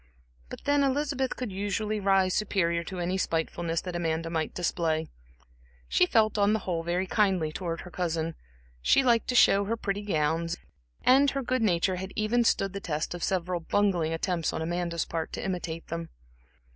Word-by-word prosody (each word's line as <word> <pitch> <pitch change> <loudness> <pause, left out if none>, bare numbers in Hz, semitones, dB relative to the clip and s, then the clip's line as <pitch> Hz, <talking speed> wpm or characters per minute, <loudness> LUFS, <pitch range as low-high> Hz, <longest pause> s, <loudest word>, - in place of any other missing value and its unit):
But - - -9
then 285 0 +3
Elizabeth 275 -1 0
could 250 -5 -4
usually 205 +2 -2
rise 195 -2 +3
superior 170 -5 +1
to 185 - -6
any 180 +2 -1
spitefulness 165 0 -1
that 180 -2 -6
Amanda 165 -1 -1
might 160 -1 -1
display. 160 -3 0 0.8
She 180 - +3
felt 215 0 +3
on 205 +1 +4
the - - +3
whole 175 -3 -2
very 175 +3 -1
kindly 190 -6 +1
towards 165 0 -4
her 180 - -11
cousin, 165 -2 -2 0.5
she 270 - +4
liked 235 -3 +3
to 250 - -1
show 200 -4 +6
her 230 +3 -1
pretty 205 -2 -2
gowns, 165 -2 0 0.5
and 275 +2 +6
her 275 0 -2
good 255 0 0
nature 185 -2 +2
had 190 +1 -6
even 225 +3 +2
stood 195 -4 +1
the 200 - -4
test 155 -4 -3
of 175 - -6
several 180 -1 0
bungling 175 -2 +1
attempts 165 0 -1
on 160 - -2
Amanda's 170 0 -1
part 165 -1 -4
to - - -4
imitate 175 -3 -3
them. 165 0 -4
180 Hz, 180 wpm, -28 LUFS, 165-210 Hz, 0.8 s, show